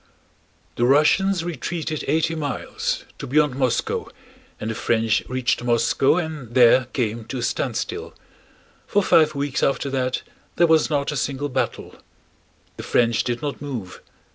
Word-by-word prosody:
The 120 - +2
Russians 165 +7 +3
retreated 165 -1 -4
eighty 160 +1 +1
miles—to 145 -2 -4
beyond 150 +1 +2
Moscow—and 125 -3 -3
the - - -2
French 115 0 +1
reached 130 -1 0
Moscow 120 +5 +2
and 155 -9 -5
there 125 0 +6
came 115 -2 -3
to 130 - -5
a 120 - -3
standstill. - - -3 0.7
For 205 - +2
five 155 -4 +4
weeks 140 -1 -2
after 140 0 0
that 130 -1 -1 0.3
there 175 - +4
was 160 -2 +3
not 145 -1 0
a - - -4
single 140 +1 -2
battle. 130 0 -3 0.8
The - - -5
French 115 -1 +2
did 120 +1 -3
not 145 -2 -4
move. 120 -11 -6
135 Hz, 140 wpm, -22 LUFS, 120-155 Hz, 0.8 s, there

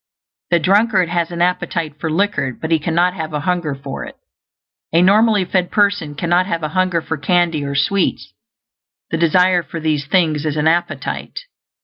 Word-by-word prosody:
The 175 - +4
drunkard 195 +1 +2
has 170 -1 -1
an 170 0 -1
appetite 170 -4 -2
for 160 - -3
liquor, 160 - -1
but 160 - -5
he 160 - +3
cannot 170 +3 +1
have 160 -3 -6
a 150 - -2
hunger 170 -3 -1
for 135 0 -7
it. - - -10 0.8
A 165 - +3
normally 210 +1 +4
fed 180 0 0
person 200 -8 +1
cannot 175 +4 +1
have 170 -4 -3
a 155 - -1
hunger 180 -1 0
for 160 - -3
candy 165 0 +1
or 140 0 -4
sweets; 190 +7 0 0.8
the 165 - 0
desire 180 +2 +3
for 165 +1 -7
these 155 -3 -1
things 155 -3 +1
is 155 -1 -2
an 150 +1 +1
appetite. 170 - -2
170 Hz, 175 wpm, -18 LUFS, 155-180 Hz, 0.8 s, The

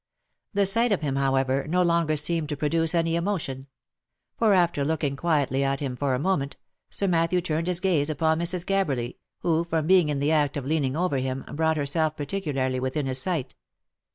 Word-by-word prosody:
The 200 0 +3
sight 230 +4 +3
of 200 - +1
him, 140 -3 -1
however, 135 0 +1
no 180 +3 +2
longer 170 -2 +2
seemed 155 +1 0
to 150 - -3
produce 165 +3 0
any 165 0 +1
emotion; 170 -7 -3 0.7
for 215 -3 +3
after 170 -5 +2
looking 145 -2 -1
quietly 140 -3 0
at 135 0 0
him 135 -3 -3
for 135 0 0
a - - -2
moment, 145 -4 -1 0.3
Sir 200 - -2
Matthew 170 0 +2
turned 165 -1 -2
his 180 -1 +2
gaze 165 -6 +1
upon 160 +1 +1
Mrs. 175 +1 0
Gabberly, 145 -12 -1 0.2
who 165 -1 +1
from 165 -2 -1
being 180 -2 +4
in 145 -2 -1
the 145 +2 +1
act 150 -2 +1
of 140 - -4
leaning 140 -2 0
over 175 -5 0
him, 130 0 -3
brought 160 +1 +1
herself 155 +2 0
particularly 140 -5 -2
within 130 +3 -2
his 130 -1 +2
sight. 155 -5 -2
155 Hz, 190 wpm, -25 LUFS, 140-170 Hz, 0.7 s, being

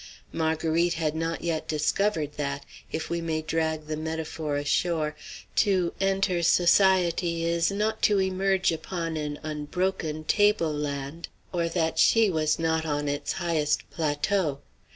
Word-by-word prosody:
Marguerite 160 +1 +1
had 155 -2 -1
not 165 0 -2
yet 160 -2 -2
discovered 155 +1 0
that 140 -1 -3 0.3
if 160 - -4
we 170 0 -1
may 160 -1 -2
drag 160 -1 -1
the 155 0 -3
metaphor 155 -1 -3
ashore 150 +1 0 0.4
to 185 -5 +2
enter 195 -2 +1
society 175 -1 +3
is 170 0 +2
not 210 +2 -1
to 205 -2 +4
emerge 190 0 +1
upon 165 0 -3
an 150 -1 -3
unbroken 155 +1 -2
table 205 -2 +3
land, 145 +2 -4 0.3
or 170 -1 0
that 160 -2 0
she 225 -3 +5
was 155 -2 +1
not 160 -1 0
on 145 -2 -1
its 145 0 -2
highest 165 -5 0
plateau. 155 0 0
165 Hz, 135 wpm, -27 LUFS, 155-180 Hz, 0.4 s, she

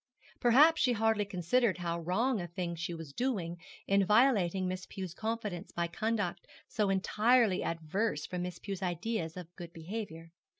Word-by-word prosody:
Perhaps 295 +7 +6
she 250 -1 +4
hardly 220 -2 +2
considered 200 +3 +1
how 170 -1 -2
wrong 200 +7 0
a 175 - -5
thing 170 0 -4
she 175 +1 -4
was 160 -4 -9
doing 190 - -2 0.3
in 195 0 +3
violating 200 -4 +3
Miss 185 0 -4
Pew's 185 -3 -6
confidence 215 -4 -4
by 170 - -1
conduct 205 +1 -2 0.2
so 210 -3 0
entirely 215 +2 +3
averse 165 +1 -1
from 180 -1 -4
Miss 180 -1 -4
Pew's 195 -1 -6
ideas 175 -1 -2
of 175 -1 -9
good 170 -2 -8
behaviour. 165 -1 -6
190 Hz, 160 wpm, -32 LUFS, 170-225 Hz, 0.3 s, Perhaps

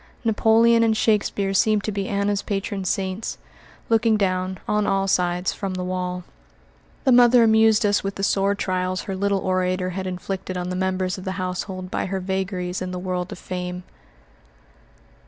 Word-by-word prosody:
Napoleon 230 +1 +4
and 225 -1 +3
Shakespeare 205 -3 +1
seemed 210 +1 +3
to 215 - -2
be 200 -1 -3
Anna's 200 0 0
patron 195 -1 -3
saints, 190 +3 -2 0.5
looking 225 -1 +3
down, 185 -1 -1
on 210 -1 +1
all 195 0 +1
sides, 180 -1 +1
from 195 -2 -4
the 180 - -3
wall. 180 0 -3 0.8
The 265 - +3
mother 245 -1 +7
amused 220 0 +4
us 205 0 +2
with 195 0 -3
the 195 - -5
sore 200 0 +2
trials 185 -1 -1
her 195 - -4
little 200 +1 +1
orator 185 0 0
had 190 +1 -4
inflicted 185 0 -4
on 180 0 -3
the 180 - -3
members 185 0 -1
of - - -9
the 190 -1 -3
household 185 0 -4
by - - -1
her 190 0 -2
vagaries 185 -1 -3
in 185 - -3
the 180 - -4
world 180 0 -3
of - - -6
fame. 180 0 -5
190 Hz, 175 wpm, -23 LUFS, 185-205 Hz, 0.8 s, mother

